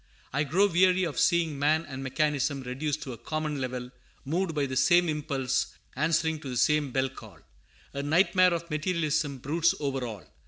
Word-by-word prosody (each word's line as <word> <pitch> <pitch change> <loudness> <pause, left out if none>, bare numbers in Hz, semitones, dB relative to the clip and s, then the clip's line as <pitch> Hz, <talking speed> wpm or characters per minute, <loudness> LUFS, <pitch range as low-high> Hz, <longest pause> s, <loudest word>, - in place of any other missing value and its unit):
I 145 - +1
grow 185 +8 +3
weary 185 0 +3
of 165 -5 -2
seeing 165 -4 +2
man 155 +3 +2
and 135 -1 -7
mechanism 140 0 0
reduced 140 +4 -3
to 130 - -6
a 115 - -11
common 155 -2 -3
level, 125 -1 -4 0.3
moved 165 +3 -1
by 145 -2 +1
the 130 -1 -4
same 175 +6 +4
impulse, 140 -4 -1 0.2
answering 160 +2 +1
to 140 - -8
the 125 - -3
same 150 +2 +2
bell 130 +1 +1
call. 110 -8 -13 0.6
A 140 - -3
nightmare 180 +4 +4
of 170 0 -5
materialism 155 -3 0
broods 160 +6 +1
over 135 -3 -2
all. 105 -9 -6
150 Hz, 180 wpm, -28 LUFS, 135-165 Hz, 0.6 s, same